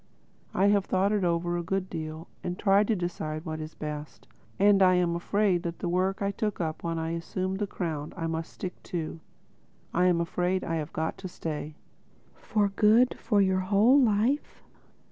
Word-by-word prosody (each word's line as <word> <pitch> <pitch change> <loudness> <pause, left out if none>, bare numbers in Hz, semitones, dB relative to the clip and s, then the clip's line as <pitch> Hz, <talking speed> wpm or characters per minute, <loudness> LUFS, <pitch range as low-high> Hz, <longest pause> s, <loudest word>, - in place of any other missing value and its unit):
I 195 +2 +4
have 200 -1 +3
thought 190 +2 +1
it 210 -2 +1
over 175 0 0
a - - -1
good 190 +2 -1
deal 160 -1 -6 0.2
and 180 0 -3
tried 200 0 +4
to 225 - +2
decide 160 -3 -4
what 155 -1 -4
was 155 0 -7
best. 150 -1 -7 0.3
And 200 0 +5
I 185 -1 +6
am 175 -1 +2
afraid 190 +1 +1
that 170 -1 -4
the - - -3
work 185 +3 0
I 200 - +1
took 210 0 -2
up 160 -3 -2
when 165 -1 -2
I 160 0 -2
assumed 185 +3 -3
the 205 - -1
crown 155 -6 -4
I 165 - -2
must 165 0 -3
stick 180 -1 -7 0.2
to. 160 0 -4 0.7
I'm 180 0 +3
afraid—I've 170 -2 -1
got 160 0 -3
to 190 - -5
stay." 155 -3 -5 0.6
"For 205 -2 0
good—for 220 +1 +3
your 190 -1 +2
whole 210 +9 +4
life?" 235 +5 +1
180 Hz, 175 wpm, -28 LUFS, 165-200 Hz, 0.7 s, I